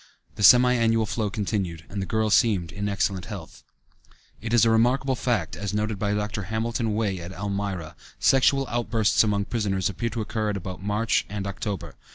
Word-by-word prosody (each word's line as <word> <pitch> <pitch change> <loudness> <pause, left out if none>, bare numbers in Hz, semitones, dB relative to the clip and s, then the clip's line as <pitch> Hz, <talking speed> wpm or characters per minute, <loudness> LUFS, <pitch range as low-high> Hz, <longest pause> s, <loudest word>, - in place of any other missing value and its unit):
The - - -8
semi 125 +4 +7
annual 115 -2 +2
flow 105 0 -2
continued 95 -5 -3
and 100 0 -5
the 95 - -4
girl 110 -1 0
seemed 100 -7 +3
in 100 0 -3
excellent 100 -2 -1
health. - - -9 0.8
It 110 0 -5
is 115 -1 +5
a 115 - +4
remarkable 125 +4 +2
fact 115 -10 -1
that, - - -8
as 105 0 -3
noted 105 -1 -1
by 105 0 0
Dr. 105 -1 -3
Hamilton 110 +1 -2
Wey 105 -4 -1
at 85 +1 -7
Elmira, 100 -4 -4 0.2
sexual 135 +1 +4
outbursts 115 -3 +2
among 100 -2 0
prisoners 100 -5 -1
appear 115 +5 -3
to 115 0 -4
occur 110 0 -2
at 100 - -2
about 95 -1 -7
March 105 +3 0
and 100 -1 -4
October. 100 -1 -4
105 Hz, 190 wpm, -25 LUFS, 100-115 Hz, 0.8 s, semi